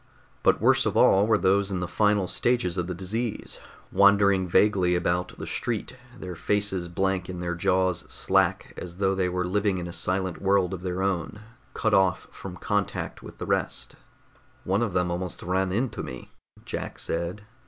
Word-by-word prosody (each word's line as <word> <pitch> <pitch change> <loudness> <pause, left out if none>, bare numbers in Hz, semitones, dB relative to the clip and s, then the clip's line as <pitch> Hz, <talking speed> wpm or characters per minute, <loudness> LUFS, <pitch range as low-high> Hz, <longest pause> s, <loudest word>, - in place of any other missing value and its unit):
But - - +3
worst - - +4
of - - -1
all 100 +2 +5
were 110 -1 +4
those 100 0 +2
in 95 -2 -2
the 90 - -2
final 105 0 +2
stages 120 -5 0
of 90 -2 -2
the 90 - -4
disease, 110 +6 -4 0.3
wandering 100 -2 +4
vaguely 90 -1 +3
about 90 +1 -1
the - - -6
street, 120 +1 -3 0.2
their 90 -3 -6
faces 95 0 -1
blank 95 +1 -1
and 90 -1 -5
their 90 0 -2
jaws 90 0 +1
slack - - +1
as 90 -1 -7
though 95 0 +2
they 95 -1 0
were 90 0 -1
living 100 +1 +1
in 90 - -4
a 85 - -7
silent 95 -1 -2
world 95 -2 +2
of 90 - -5
their 90 0 -2
own, 95 +1 -2 0.3
cut - - 0
off 95 -1 +3
from 95 -2 -8
contact 105 0 -2
with - - -11
the - - -5
rest. - - -2 0.7
"One 95 +4 +1
of 115 -6 -1
them 90 -1 +1
almost 90 0 -4
ran 95 +1 0
into 115 +5 -1
me," 65 - -8 0.3
Jack - - -5
said. 85 +5 -3
95 Hz, 180 wpm, -26 LUFS, 90-100 Hz, 0.7 s, all